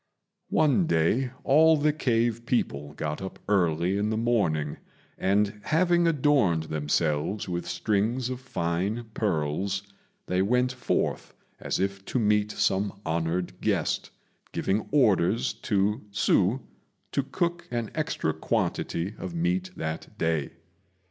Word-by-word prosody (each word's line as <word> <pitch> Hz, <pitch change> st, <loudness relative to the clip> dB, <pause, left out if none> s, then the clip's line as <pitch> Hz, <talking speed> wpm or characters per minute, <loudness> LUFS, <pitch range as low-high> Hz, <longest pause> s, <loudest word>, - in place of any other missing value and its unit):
One 155 Hz, +3 st, +3 dB
day 110 Hz, -, +2 dB
all 160 Hz, +3 st, +6 dB
the 150 Hz, +1 st, +2 dB
cave 120 Hz, -4 st, 0 dB
people 75 Hz, -, -1 dB
got 75 Hz, +2 st, -3 dB
up 95 Hz, -, -6 dB
early 90 Hz, -1 st, +2 dB
in 105 Hz, +1 st, 0 dB
the 110 Hz, -, 0 dB
morning, 95 Hz, -11 st, +1 dB, 0.4 s
and, 105 Hz, +2 st, +1 dB
having 175 Hz, +1 st, +3 dB
adorned 135 Hz, -, +3 dB
themselves 75 Hz, +5 st, -1 dB
with 85 Hz, -1 st, -3 dB
strings 110 Hz, +7 st, 0 dB
of 125 Hz, -, -4 dB
fine 105 Hz, 0 st, -2 dB
pearls, 95 Hz, 0 st, -1 dB, 0.4 s
they 90 Hz, 0 st, +1 dB
went 125 Hz, +5 st, +2 dB
forth 125 Hz, -, -2 dB, 0.2 s
as -, -, -2 dB
if 100 Hz, 0 st, -1 dB
to -, -, -2 dB
meet 105 Hz, -2 st, +2 dB
some 100 Hz, 0 st, 0 dB
honoured 85 Hz, +2 st, -2 dB
guest, -, -, 0 dB, 0.4 s
giving 100 Hz, +3 st, -1 dB
orders 115 Hz, -, +3 dB, 0.2 s
to 105 Hz, +2 st, +2 dB
Hsü 105 Hz, +3 st, +2 dB, 0.5 s
to -, -, +1 dB
cook 170 Hz, +5 st, -2 dB
an 120 Hz, -3 st, -3 dB
extra 80 Hz, -, -1 dB
quantity 85 Hz, +3 st, -1 dB
of 170 Hz, -, -5 dB
meat 180 Hz, +2 st, 0 dB
that 80 Hz, +1 st, -5 dB
day. 80 Hz, -4 st, 0 dB
105 Hz, 125 wpm, -27 LUFS, 85-125 Hz, 0.5 s, all